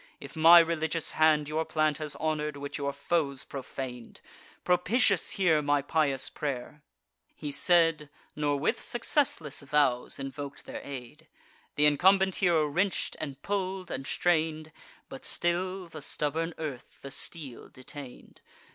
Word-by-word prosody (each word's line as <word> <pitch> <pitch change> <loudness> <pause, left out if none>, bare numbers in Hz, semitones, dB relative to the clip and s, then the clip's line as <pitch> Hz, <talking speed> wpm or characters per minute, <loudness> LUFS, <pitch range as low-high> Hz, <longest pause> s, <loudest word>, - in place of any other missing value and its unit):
If - - -11
my 165 +2 +9
religious 165 -1 +2
hand 155 -2 +3
Your 155 +2 -1
plant 155 -2 0
has 150 -2 -4
honour'd, 150 0 -2
which 140 +1 -6
your 140 0 -1
foes 140 -1 -1
profan'd, 130 -3 -7 0.4
Propitious 195 +3 +2
hear 170 -6 +3
my 145 -1 +1
pious 140 -3 +1
pray'r!" 140 +1 -5 0.5
He 145 - -5
said, 165 -2 +3 0.3
Nor 145 -1 0
with 140 - 0
successless 235 - +1
vows 140 -3 +1
invok'd 140 +1 -7
their - - -7
aid. 140 +3 -9 0.5
Th' - - -1
incumbent 190 +6 +4
hero 170 -4 +4
wrench'd, 175 +6 0
and 140 -2 -6
pull'd, 190 -2 -3
and 135 +1 -4
strain'd; 155 -2 0 0.4
But - - -10
still 185 +2 -1
the 160 -2 -9
stubborn 160 +4 -2
earth 145 -6 -7
the 135 - -7
steel 140 -3 -5
detain'd. 130 0 -11
155 Hz, 135 wpm, -29 LUFS, 140-170 Hz, 0.5 s, my